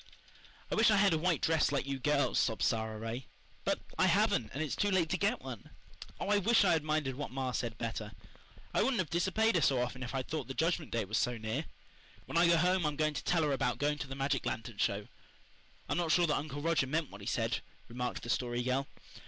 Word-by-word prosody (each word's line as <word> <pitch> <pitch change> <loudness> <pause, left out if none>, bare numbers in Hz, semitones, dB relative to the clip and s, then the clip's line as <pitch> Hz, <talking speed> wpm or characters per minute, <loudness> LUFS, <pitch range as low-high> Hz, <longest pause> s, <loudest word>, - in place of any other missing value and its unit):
"I - - 0
wish - - +5
I 215 - +5
had 200 -3 +4
a - - +2
white 170 -1 +1
dress 160 -2 +3
like 140 -2 0
you 135 -1 -3
girls," 145 +2 +2
sobbed 110 -3 0
Sara 110 -1 0
Ray. 115 +4 -5 0.4
"But - - 0 0.2
I - - +5
haven't, 110 - +2
and 145 +4 -2
it's 155 - -2
too 205 - +1
late 180 -4 +2
to 180 - +1
get 215 +5 0
one. 125 -5 -8 0.5
Oh, - - -3
I 205 0 +4
wish 225 +1 +4
I 180 - +4
had 160 -3 +2
minded 155 -3 0
what 145 +3 -5
ma 130 +1 -2
said 120 -2 -3
better. 110 -2 -4 0.6
I - - +3
wouldn't 250 +2 +2
have 175 -7 -1
disobeyed 190 +6 +2
her 170 - +2
so 135 -3 +3
often 125 +1 -3
if 130 +1 -5
I'd 130 -1 -2
thought 150 -6 -3
the 135 - -6
Judgment 165 -2 0
Day 115 -3 -1
was 105 +2 0
so 125 -1 0
near. 110 0 -3 0.6
When - - -7
I 170 +1 +5
go 170 0 +5
home 180 +2 +2
I'm 150 -1 0
going 155 0 +1
to - - -4
tell 170 -2 +2
her 150 - +1
about 125 -2 0
going 150 +1 0
to 150 - -4
the 135 - -6
magic 135 -1 0
lantern 110 -1 -4
show." 100 +1 0 0.8
"I'm - - 0
not 170 -2 0
sure 175 +2 +5
that 150 - +1
Uncle 145 -1 -4
Roger 165 -5 +2
meant 155 +1 -1
what 100 +1 -10
he 100 - -8
said," 115 0 0 0.3
remarked 125 +1 -4
the 120 - -2
Story 120 -1 -1
Girl. 130 +2 0
140 Hz, 245 wpm, -33 LUFS, 120-165 Hz, 0.8 s, wish